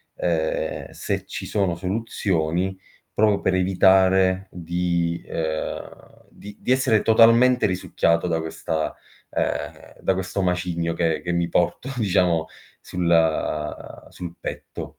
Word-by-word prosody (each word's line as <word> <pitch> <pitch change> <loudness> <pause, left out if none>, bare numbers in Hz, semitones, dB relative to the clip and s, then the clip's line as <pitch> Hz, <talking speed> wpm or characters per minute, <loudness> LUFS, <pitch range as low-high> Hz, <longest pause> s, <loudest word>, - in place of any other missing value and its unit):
ehm, - - -1
se - - -3
ci - - -6
sono 95 -5 0
soluzioni 95 -2 -1 0.4
proprio 105 -1 +3
per 95 - +1
evitare 95 0 +4
di 85 -1 -1
ehm, 80 -1 -5
di 105 0 -12
di 125 - -2
essere 130 -5 +3
totalmente 115 +2 +5
risucchiato 90 -2 0
da 80 -1 0
questa 80 -1 -3 0.4
ehm, - - -3
da 95 - +2
questo 95 +1 -3
macigno 90 -2 -1
che 80 -2 0
che 90 - -3
mi 85 0 +1
porto 90 +10 0
diciamo 90 -6 +2 0.3
sul 80 -3 -1
sul 85 -1 -8
petto. - - -6
90 Hz, 115 wpm, -23 LUFS, 85-100 Hz, 0.4 s, totalmente